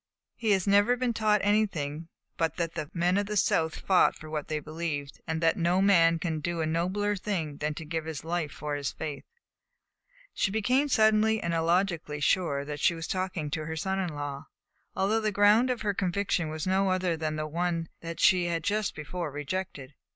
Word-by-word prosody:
"He 225 -3 -2
has 190 -2 +1
never 205 +5 +4
been 245 -1 0
taught 215 -2 +2
anything 170 -7 0 0.3
but 165 -1 0
that 170 -2 -2
the 155 -3 -5
men 180 +2 +1
of 205 - -2
the 210 0 -2
South 160 -4 +2
fought 190 -2 +3
for 155 0 -11
what 150 -2 -3
they 155 -1 -2
believed, 150 -2 -5
and 160 0 -2
that 165 0 +3
no 175 +2 +2
man 170 -4 +5
can 160 -2 -2
do 170 +3 -3
a 160 - +1
nobler 185 +6 0
thing 170 -7 -3
than 150 0 -2
to 160 - -7
give 160 0 -3
his 160 -3 -5
life 165 -2 -2
for 150 -1 -5
his 145 -1 -2
faith." 150 -3 -6 1.1
She - - +1
became 250 +7 +2
suddenly 220 -1 +4
and 170 -3 -2
illogically 165 -2 0
sure 145 -3 +1
that 150 0 -5
she 170 - +3
was 165 0 -5
talking 185 -5 -3
to 155 0 -3
her 160 - -4
son 190 +4 -1
in 175 -5 -3
law, 145 -1 -5 0.5
although 215 +4 +1
the 215 -1 0
ground 210 +5 +4
of 250 -2 -1
her 205 -1 +1
conviction 185 -3 -1
was 155 0 -4
no 190 +1 +2
other 185 -2 +1
than 155 -1 -2
the 155 0 -2
one 165 +1 -1 0.3
she 180 -2 +4
had 165 -1 -2
just 210 0 -1
before 165 +2 -4
rejected. 145 -1 -5
170 Hz, 200 wpm, -28 LUFS, 155-200 Hz, 1.1 s, man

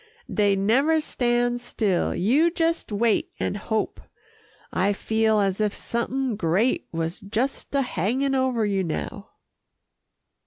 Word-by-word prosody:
Dey 205 -2 +3
never 265 +11 +3
stand 245 -4 0
still. 210 -6 0
You 270 - +3
jes' 330 0 +1
wait 220 +1 +1
an' - - -1
hope. 215 +2 -2 0.7
I 195 +2 +2
feel 220 +1 +1
as 195 0 0
if 210 -1 0
somethin' 240 0 -2
great 190 +7 +1
was 165 +1 -3
jes' 255 +5 -1
a 280 -1 +2
hangin' 250 +6 0
over 260 -4 +1
you 195 -2 0
now." 80 - -4
220 Hz, 125 wpm, -24 LUFS, 200-260 Hz, 0.7 s, Dey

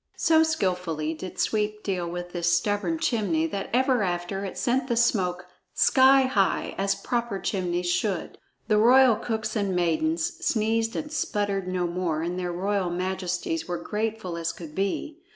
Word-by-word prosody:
So 320 -1 +4
skillfully 180 - 0
did 185 +3 -8
Sweep 210 0 -1
deal 180 -3 -2
with 175 +1 -6
this 175 -1 0
stubborn 205 - +1
chimney 205 - 0
that 195 +4 -4
ever 255 -1 +2
afterward 180 +1 -2
it 190 - -6
sent 255 +1 0
the 240 - 0
smoke 185 -6 +1 0.3
sky 270 +1 +6
high, 210 -7 +1
as 195 0 0
proper 235 +1 -2
chimneys 180 -3 -2
should. 175 +1 -1 0.3
The 210 -1 +3
royal 250 +1 +6
cooks 220 -1 -3
and 200 -3 0
maidens 315 - 0
sneezed 225 0 +1
and 300 -1 -4
sputtered 205 -9 -1
no 185 -1 -1
more, 170 -2 -2
and 175 +2 -3
their 180 -1 -2
royal 190 +1 -1
majesties 180 -2 -2
were 175 -1 -2
grateful 210 -1 -3
as 165 0 -2
could 160 -3 -10
be. 200 - -2
195 Hz, 160 wpm, -26 LUFS, 175-230 Hz, 0.3 s, sky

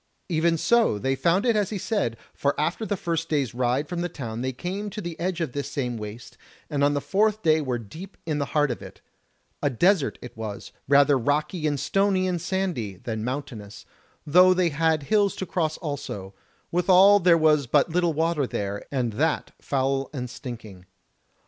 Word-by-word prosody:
Even 165 0 +2
so 230 - +3
they 135 +6 0
found 170 - +1
it 235 -2 +3
as 205 -2 +1
he 215 - -3
said; 185 - -1 0.2
for 140 - -1
after 170 +8 -1
the 205 - -1
first 165 -2 -2
day's 140 -7 0
ride 125 +4 0
from 175 +1 -3
the 175 - -2
town 120 -8 -6
they 130 +1 -1
came 185 +10 -4
to 210 +2 -7
the 175 -4 -5
edge 180 0 -2
of 160 -6 -2
this 140 +2 -4
same 125 -4 -2
waste, 105 +1 -9 0.3
and 140 -1 0
on 145 0 +3
the - - +1
fourth 215 +4 +1
day 155 -1 +4
were 130 -4 -1
deep 160 - -10
in 155 -3 -1
the 140 - -1
heart 145 -2 +3
of 120 - -5
it: - - -11 0.6
a 145 - +2
desert 165 - +2
it 125 - -10
was, 110 -2 -6 0.2
rather 140 0 +5
rocky 150 +5 0
and 145 -2 -1
stony 195 +1 +1
and 175 -2 -1
sandy 175 - -2
than 110 +2 -5
mountainous, 120 -6 -6 0.4
though 180 +4 +6
they 180 -2 +2
had 160 0 +1
hills 205 +5 +2
to 190 - -4
cross 160 -4 -1
also: 140 - -5 0.4
withal 185 +3 +6
there 175 -2 +5
was 155 -4 +3
but 145 +6 +3
little 175 0 +2
water 160 -3 0
there, 100 -2 -4
and 125 -5 -1
that 155 +7 0
foul 135 0 -1
and 125 -4 -5
stinking. 115 -8 -9
150 Hz, 195 wpm, -25 LUFS, 125-180 Hz, 0.6 s, though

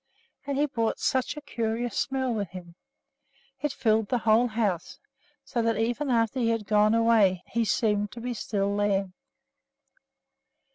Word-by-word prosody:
And 280 -1 -1
he 290 - +3
brought 230 -6 -1
such 260 +3 0
a - - -6
curious 235 -4 -3
smell 260 -2 -1
with 205 -5 -3
him! 175 -2 -10 0.9
It 295 - 0
filled 225 -6 +1
the 250 - +2
whole 225 +1 +3
house, 210 -7 -2 0.5
so 235 - -1
that, 230 -2 +1
even 240 +6 -1
after 230 +1 +1
he 230 -2 +2
had 225 -2 -1
gone 210 +1 +3
away, 220 -6 +3
he 235 - -1
seemed 210 0 +1
to 235 - -8
be 245 +1 -3
still 200 -3 -1
there. 200 -2 0
225 Hz, 155 wpm, -27 LUFS, 205-245 Hz, 0.9 s, he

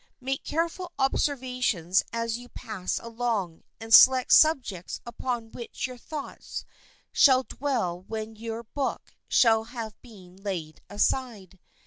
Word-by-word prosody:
Make 270 +1 -3
careful 335 +3 -2
observations 250 - +1
as 230 -1 -2
you 245 0 -12
pass 215 -7 -4
along, 225 -7 -3 0.2
and 225 0 -3
select 255 +1 +8
subjects 255 - +3
upon 235 -1 -4
which 235 - -5
your 255 -1 -7
thoughts 300 +1 -7 0.5
shall 265 -3 +5
dwell 240 -12 -2
when 220 0 -5
your 225 +1 -6
book 270 +4 -4
shall 225 -2 +4
have 230 -2 -6
been 190 -7 -15
laid 180 -6 -5
aside. 205 -3 -1
230 Hz, 120 wpm, -27 LUFS, 205-260 Hz, 0.5 s, select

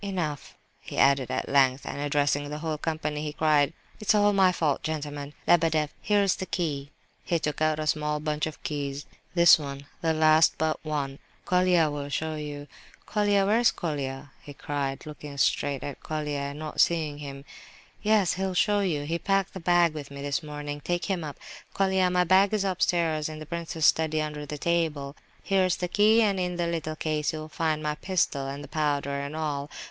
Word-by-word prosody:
"Enough!" 175 -8 -3 0.2
he - - -9
added 135 -3 +4
at - - -2
length, 135 -1 +3
and - - -5
addressing 145 0 +1
the 150 - -4
whole 155 -1 -3
company, 155 -2 -2
he 150 -1 -3
cried: 150 -2 +3 0.3
"It's 215 0 +2
all 205 0 +4
my 190 -2 +5
fault, 155 -5 0
gentlemen! 145 -2 -4
Lebedeff, 160 -3 +3
here's 200 -2 +2
the 190 - -5
key," 145 -5 -2 0.3
(he 170 - +1
took 155 -1 -3
out 155 -1 +2
a 155 - -3
small 150 0 0
bunch 150 0 -1
of 155 - -9
keys); 145 -1 -3 0.3
"this 170 -1 +7
one, 140 -1 -7 0.2
the 165 - +2
last 155 0 +5
but 160 0 -1
one—Colia 155 +3 0
will 145 -1 -5
show 160 +2 -2
you—Colia, 155 +7 -2
where's 225 +4 +4
Colia?" 140 -4 -4
he 145 - -11
cried, 140 -1 -3
looking 150 -1 -9
straight 140 +1 +1
at 145 -2 -6
Colia 150 -2 -3
and 140 - -8
not 155 0 -1
seeing 155 -4 +1
him. 140 -1 -8 0.6
"Yes, 210 -4 +3
he'll 190 0 -2
show 205 +3 +3
you; 170 -7 0
he 165 +3 -2
packed 195 0 0
the 190 - -6
bag 175 -1 +3
with 145 -3 -7
me 140 0 -8
this 145 +5 -1
morning. 145 -1 -6
Take 175 0 -1
him 190 -4 -1
up, 150 -2 -6 0.4
Colia; 190 -1 +2
my 180 0 +3
bag 190 +4 +4
is 205 - 0
upstairs 170 -5 +1
in 155 - -7
the 155 - -8
prince's 165 -1 -2
study, 160 -1 +3
under 150 -1 -4
the 150 - -5
table. 155 -4 -1 0.3
Here's 190 -2 +2
the 180 - -3
key, 215 +5 +4
and 200 -3 +1
in 180 -1 -1
the 175 0 -1
little 165 -2 -3
case 155 0 -1
you'll 155 0 -6
find 155 -1 -1
my 150 0 0
pistol 150 -5 -1
and 140 +1 -6
the - - -9
powder, 145 -2 -1
and 140 +2 -5
all. 150 -2 -3
155 Hz, 190 wpm, -27 LUFS, 145-175 Hz, 0.6 s, this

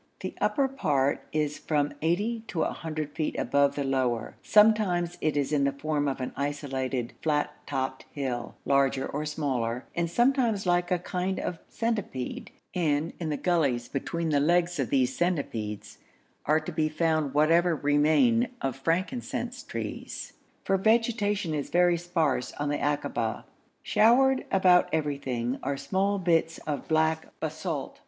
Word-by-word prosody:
The - - -4
upper 275 -2 +2
part 145 - 0
is 150 -1 -1
from 145 -2 0
80 210 +8 0
to 165 - -2
100 155 -2 -3
feet 155 +1 -2
above 140 0 +2
the 145 - -1
lower; 130 -4 -1
sometimes 205 -5 +4
it 155 -1 +1
is 145 +1 0
in 145 -2 +3
the 140 - +2
form 145 +1 -1
of 135 -1 -2
an 125 - -4
isolated 135 -4 -2
flat 150 -2 +1 0.2
topped 130 -1 -3
hill, 130 -4 -4
larger 140 -1 +2
or 150 +2 -3
smaller, 130 -6 -2
and 170 -1 -1
sometimes 240 - +2
like 175 0 +2
a 180 - +2
kind 180 +2 -2
of 175 -2 -4
centipede, 210 - -3 0.2
and 160 -2 0
in 165 -3 -3
the 150 - -1
gullies 140 -10 +1
between 165 +5 -2
the 145 -2 +3
legs 175 +2 +2
of 135 - 0
these 130 -2 +2
centipedes 110 - -2 0.5
are 155 +2 +4
to 155 - -6
be 155 -1 0
found 155 -3 0
whatever 165 +3 +4
remain 155 - +3
of 135 -2 -2
frankincense 235 - -2
trees, - - -6 0.3
for 195 - +2
vegetation 210 -4 +1
is 145 -2 -3
very 175 0 +4
sparse 165 -7 -1
on 145 0 -2
the 145 - -1
akaba. 140 -6 -1 0.4
Showered 260 +4 +4
about 185 -2 +5
everywhere 135 -5 -1
are 140 +1 -2
small 190 +8 0
bits 165 -3 +1
of 145 -2 -3
black 160 0 +1
basalt. 155 -2 -4
155 Hz, 150 wpm, -28 LUFS, 140-180 Hz, 0.5 s, about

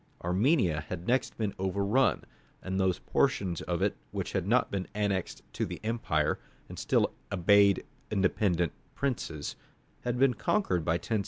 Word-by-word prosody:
Armenia 90 - +2
had 90 -1 -5
next 130 +2 +1
been 105 -3 -1
overrun, 100 +7 +2 0.4
and 95 +1 -2
those 95 -2 +2
portions 100 -11 0
of - - -1
it - - +1
which - - -4
had 95 -1 -1
not 120 +4 +3
been 95 -2 -2
annexed 100 -4 -1
to - - -2
the - - -4
empire, 110 -10 0 0.3
and - - -8
still - - +2 0.2
obeyed 100 +1 +4 0.2
independent 95 -4 +1 0.2
princes, 100 - -3 0.4
had 120 0 -2
been 135 0 +4
conquered 110 - 0
by 80 - +1
1064. 105 +5 -1
100 Hz, 150 wpm, -30 LUFS, 90-115 Hz, 0.4 s, obeyed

